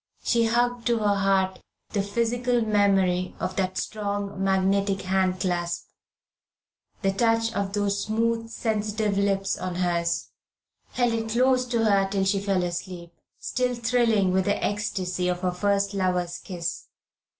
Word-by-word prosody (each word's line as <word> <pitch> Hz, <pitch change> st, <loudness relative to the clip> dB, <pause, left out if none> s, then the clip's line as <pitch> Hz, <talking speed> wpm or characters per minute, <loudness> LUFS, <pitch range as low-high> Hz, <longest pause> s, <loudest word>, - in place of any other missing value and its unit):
She 235 Hz, -1 st, +2 dB
hugged 240 Hz, +1 st, +1 dB
to 235 Hz, -1 st, +3 dB
her 210 Hz, -2 st, +2 dB
heart 195 Hz, -1 st, +1 dB, 0.3 s
the 205 Hz, -, 0 dB
physical 235 Hz, +4 st, 0 dB
memory 195 Hz, -4 st, +2 dB
of 185 Hz, -, -3 dB
that 185 Hz, -1 st, -1 dB
strong 200 Hz, -2 st, -3 dB
magnetic 195 Hz, +1 st, +1 dB
hand 185 Hz, 0 st, +1 dB
clasp, 175 Hz, -2 st, -2 dB, 1.1 s
the 195 Hz, -, +3 dB
touch 225 Hz, +2 st, +1 dB
of 200 Hz, -2 st, -2 dB
those 200 Hz, -1 st, 0 dB
smooth 230 Hz, +1 st, 0 dB
sensitive 215 Hz, -2 st, -1 dB
lips 195 Hz, -1 st, 0 dB
on 185 Hz, -1 st, -4 dB
hers 170 Hz, -1 st, 0 dB, 0.6 s
held 245 Hz, -2 st, +1 dB
it 225 Hz, -1 st, -2 dB
close 255 Hz, +2 st, +2 dB
to 235 Hz, -2 st, +1 dB
her 195 Hz, -2 st, +3 dB
till 195 Hz, -1 st, 0 dB
she 195 Hz, +1 st, +2 dB
fell 195 Hz, -2 st, +1 dB
asleep, 175 Hz, 0 st, -5 dB, 0.2 s
still 250 Hz, 0 st, -1 dB
thrilling 230 Hz, -5 st, +2 dB
with 190 Hz, 0 st, +2 dB
the 205 Hz, -, 0 dB
ecstasy 185 Hz, -3 st, -2 dB
of 180 Hz, 0 st, -1 dB
her 180 Hz, -1 st, +1 dB
first 200 Hz, +2 st, 0 dB
lover's 180 Hz, -2 st, -1 dB
kiss. 175 Hz, -3 st, -5 dB
200 Hz, 145 wpm, -25 LUFS, 185-225 Hz, 1.1 s, to